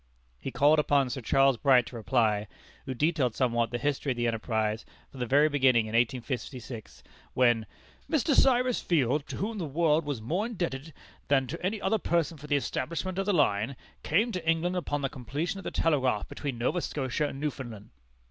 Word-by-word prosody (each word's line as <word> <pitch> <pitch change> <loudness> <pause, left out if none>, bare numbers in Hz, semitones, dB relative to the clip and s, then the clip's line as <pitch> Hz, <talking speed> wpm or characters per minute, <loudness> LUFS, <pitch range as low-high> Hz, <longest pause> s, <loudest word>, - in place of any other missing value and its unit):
He - - -5
called 145 +3 +4
upon 140 -3 +2
Sir 130 +1 -4
Charles 135 +2 +3
Bright 130 -1 +4
to - - -10
reply, 110 -3 +1 0.4
who 130 - -3
detailed 145 -4 +1
somewhat 120 -3 +1
the 120 - -2
history 140 0 -1
of - - -14
the 120 0 -1
enterprise 110 -1 -1 0.3
from 135 - -11
the 125 - -2
very 145 +5 +5
beginning 130 -6 +3
in 110 - -7
1856, 120 -1 -3 0.3
when 120 -3 +3 0.4
"Mr. 310 -1 +2
Cyrus 250 -2 +3
Field, 145 -3 +1
to - - -6
whom 210 +2 -3
the 170 - -2
world 160 +2 +2
was 145 -5 -3
more 170 - -1
indebted 165 - -4 0.4
than 135 -2 +3
to 165 +7 -7
any 205 +4 -1
other 205 +3 +1
person 165 -4 0
for 150 - -10
the 145 - +2
establishment 170 +7 -2
of 195 - -1
the - - +3
line, 135 - +1 0.3
came 215 +10 +1
to 180 -5 -4
England 165 +3 +1
upon 145 -5 -2
the - - +2
completion 145 - -4
of - - -9
the - - -3
telegraph 130 -9 +1
between 140 -5 -5
Nova 130 +9 0
Scotia 145 0 -2
and 135 - -7
Newfoundland." 120 -8 -5
140 Hz, 190 wpm, -28 LUFS, 120-165 Hz, 0.4 s, very